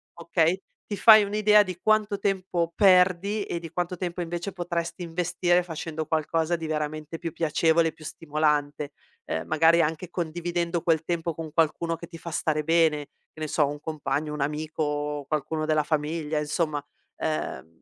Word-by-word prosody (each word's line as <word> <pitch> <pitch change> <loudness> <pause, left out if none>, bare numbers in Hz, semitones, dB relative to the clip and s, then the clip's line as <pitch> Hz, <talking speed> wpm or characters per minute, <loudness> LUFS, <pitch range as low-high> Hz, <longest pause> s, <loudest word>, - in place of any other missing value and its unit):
okay, 170 +1 +1 0.3
ti 205 - -4
fai 220 -2 +8
un'idea 210 +1 +4
di 185 -3 -7
quanto 215 -2 +2
tempo 185 -4 -1
perdi 190 +1 +4
e - - -3
di 165 -2 -9
quanto 180 +1 -2
tempo 175 -1 -3
invece 175 +3 -4
potresti 170 -1 -3
investire 175 +1 +1
facendo 160 -2 -5
qualcosa 160 +2 0
di 165 -1 -5
veramente 155 +1 -3
più 165 - -4
piacevole, 165 0 +2
più 160 - -15
stimolante, 150 -2 -1 0.3
uhm, 80 - -2
magari 165 +2 +5
anche 160 +2 -2
condividendo 170 0 -2
quel 165 -2 +2
tempo 170 0 -2
con 160 0 -7
qualcuno 165 +1 +1
che 170 - -9
ti 165 - -10
fa 170 - -7
stare 155 -1 0
bene, 160 -2 +2 0.3
che - - -14
ne 155 - -2
so, 150 0 +2
un 145 +1 -5
compagno, 150 -1 -3
un 150 - -4
amico, 150 -1 -2
qualcuno 155 +1 -2
della 155 -1 +2
famiglia, 155 0 -1
insomma. 150 -1 -1 0.3
Ehm, 85 - -4
165 Hz, 160 wpm, -26 LUFS, 155-175 Hz, 0.3 s, fai